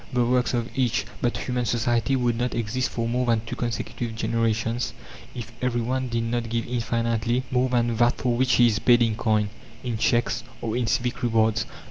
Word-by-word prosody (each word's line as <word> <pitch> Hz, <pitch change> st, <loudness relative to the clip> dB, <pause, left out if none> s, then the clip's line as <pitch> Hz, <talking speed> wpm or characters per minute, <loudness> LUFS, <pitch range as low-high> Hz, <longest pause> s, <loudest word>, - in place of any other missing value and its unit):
"The 125 Hz, -2 st, +2 dB
works 125 Hz, +1 st, +2 dB
of 120 Hz, -1 st, -1 dB
each!" 125 Hz, -3 st, +1 dB, 0.2 s
But 120 Hz, -, 0 dB
human 125 Hz, -1 st, -2 dB
society 120 Hz, +1 st, +1 dB
would 120 Hz, -2 st, +1 dB
not 120 Hz, +1 st, -1 dB
exist 120 Hz, +3 st, -1 dB
for 115 Hz, -1 st, -2 dB
more 125 Hz, +1 st, 0 dB
than 115 Hz, -2 st, +3 dB
two -, -, -5 dB
consecutive 120 Hz, -1 st, -3 dB
generations 115 Hz, +1 st, 0 dB, 0.4 s
if 115 Hz, -2 st, -6 dB
everyone 125 Hz, +1 st, 0 dB
did 115 Hz, -1 st, -1 dB
not 115 Hz, 0 st, -2 dB
give 115 Hz, 0 st, -1 dB
infinitely 115 Hz, 0 st, 0 dB
more 130 Hz, 0 st, +2 dB
than 120 Hz, -2 st, +1 dB
that 120 Hz, +1 st, +3 dB
for 125 Hz, -2 st, 0 dB
which 130 Hz, +1 st, +2 dB
he 120 Hz, -, +6 dB
is 110 Hz, -2 st, +2 dB
paid 120 Hz, 0 st, +5 dB
in 110 Hz, -2 st, +1 dB
coin, 110 Hz, -2 st, +1 dB, 0.3 s
in 120 Hz, -3 st, -3 dB
"cheques," 120 Hz, +2 st, +1 dB, 0.2 s
or 115 Hz, -1 st, -3 dB
in 120 Hz, -2 st, 0 dB
civic 120 Hz, +1 st, 0 dB
rewards. 110 Hz, -2 st, +2 dB
120 Hz, 190 wpm, -25 LUFS, 115-125 Hz, 0.4 s, he